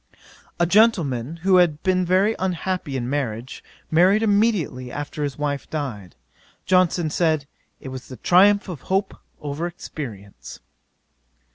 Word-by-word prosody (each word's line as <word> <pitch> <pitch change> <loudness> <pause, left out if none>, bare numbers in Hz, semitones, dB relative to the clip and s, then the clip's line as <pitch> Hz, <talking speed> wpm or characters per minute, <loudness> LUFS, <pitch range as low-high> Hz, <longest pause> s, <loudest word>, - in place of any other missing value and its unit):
'A 170 - +4
gentleman 165 - +2
who 190 -1 +5
had 165 -4 +2
been 185 -1 +2
very 190 +5 +2
unhappy 180 -5 -2
in 120 -1 -3
marriage, 125 -3 -4 0.3
married 185 +7 +4
immediately 200 - +1
after 145 +1 -5
his 140 -3 -3
wife 145 -1 -3
died: 120 - -5 0.5
Johnson 180 -3 +2
said, 155 -3 +1 0.3
it 135 - -8
was 130 -1 -8
the 130 - -10
triumph 200 +4 +4
of 170 -8 -7
hope 195 +1 0 0.3
over 150 +4 -3
experience. 115 - -9
160 Hz, 130 wpm, -22 LUFS, 135-185 Hz, 0.5 s, who